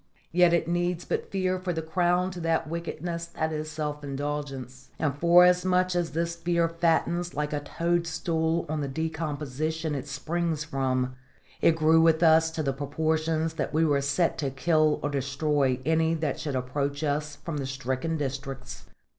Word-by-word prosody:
Yet 175 0 +5
it 170 -1 +2
needs 175 0 -1
but - - -2
fear 185 -1 0
for 180 -1 -2
the 160 -1 -3
crown 180 +2 +1
to 180 - -7
that 165 -1 0
wickedness 170 +1 -4
that 160 -1 -2
is 155 0 -3
self 150 -1 -4
indulgence; 135 -2 -5
and 145 -3 0
forasmuch 180 +2 +4
as 175 -2 -1
this 170 +1 -1
fear 170 0 +1
fattens 170 +1 0
like 150 +1 -2
a 145 - 0
toadstool 165 +1 -1
on 155 0 -2
the 140 - -2
decomposition 155 +1 -3
it 140 0 -4
springs 160 +2 -2
from, 130 -3 -1 0.5
it 165 - +5
grew 160 0 +5
with 165 0 +4
us 160 0 +6
to 160 -1 -3
the 135 -2 0
proportions 155 +3 -1
that 155 -1 -3
we 160 +1 +4
were 145 -2 +2
set 140 +5 +1
to 140 - 0
kill 155 +2 +2
or 145 - -1
destroy 140 -1 0
any 160 +1 +2
that 155 -4 -2
should 145 -4 -3
approach 140 +3 -2
us 150 0 -1
from 160 0 -5
the 135 -2 -3
stricken 135 +4 -2
districts. 135 -2 -5
160 Hz, 170 wpm, -27 LUFS, 145-170 Hz, 0.5 s, us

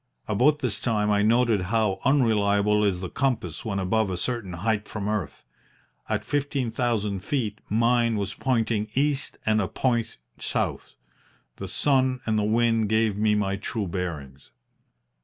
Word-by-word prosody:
About 125 +9 +3
this 125 -7 -2
time 105 -3 0
I 105 0 +3
noted 115 -1 +3
how 110 -3 +1
unreliable 105 -6 +3
is 95 -3 +1
the 90 - -3
compass 115 - -2
when 100 -3 -3
above 100 +2 +1
a 90 - -3
certain 110 -1 -3
height 105 +4 -1
from 105 -2 -4
earth. 105 -7 -3 0.6
At 105 -1 -1
fifteen 140 -3 -1
thousand 110 -4 -1
feet 110 0 -2
mine 115 +1 +2
was 100 -2 -2
pointing 115 -4 0
east 145 +1 0
and 110 0 +3
a 95 - -1
point 120 0 -1 0.2
south. - - -3 0.6
The - - -6
sun 130 -2 +1
and 110 -1 +1
the - - 0
wind 115 0 +2
gave 110 -1 +2
me 105 0 +2
my 100 -1 0
true 100 +1 -3
bearings. 80 -7 -5
110 Hz, 155 wpm, -25 LUFS, 100-120 Hz, 0.6 s, About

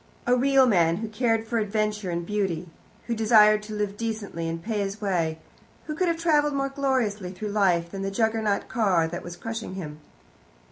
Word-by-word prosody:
A 245 - +4
real 270 +1 +4
man, 170 -8 +3
who 225 - -4
cared 225 0 0
for 230 0 0
adventure 210 -2 -1
and 170 0 -2
beauty, 190 -4 -2 0.4
who 235 - -2
desired 215 -1 +5
to 210 0 -7
live 205 -1 -2
decently 210 -7 -3
and 165 0 -3
pay 215 +4 -3
his 200 +1 -3
way, 170 -6 0 0.5
who 305 - -4
could 360 +4 0
have 335 -1 +1
travelled 300 -3 +2
more 275 0 0
gloriously 255 -9 -1
through 205 +3 -5
life 180 -5 +2
than 195 - -5
the 195 - -1
Juggernaut 220 0 0
car 190 -9 +2
that 175 +1 -5
was 175 0 -8
crushing 225 -1 -5
him. 155 -5 -7
210 Hz, 190 wpm, -26 LUFS, 185-230 Hz, 0.5 s, desired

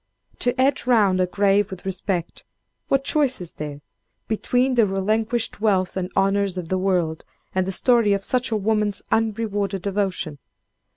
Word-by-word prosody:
To 245 - +2
hedge 265 -1 +1
round 205 -7 +4
a 180 - +2
grave 200 +1 +2
with 190 -1 -9
respect, 185 -2 -3 0.4
what 275 0 +2
choice 280 -3 +1
is 175 -2 -6
there, 145 -1 -7 0.5
between 250 +4 +1
the 230 -4 +4
relinquished 215 +4 -1
wealth 190 -4 +1
and 185 -1 -3
honors 195 -1 +1
of 170 -3 -5
the 185 - 0
world, 180 -4 0 0.3
and 185 0 0
the - - -1
story 230 +1 +3
of 200 0 -1
such 255 +3 +1
a 220 - 0
woman's 210 -1 0
unrewarded 205 -4 -1
devotion! 190 -7 -2
200 Hz, 160 wpm, -23 LUFS, 185-225 Hz, 0.5 s, round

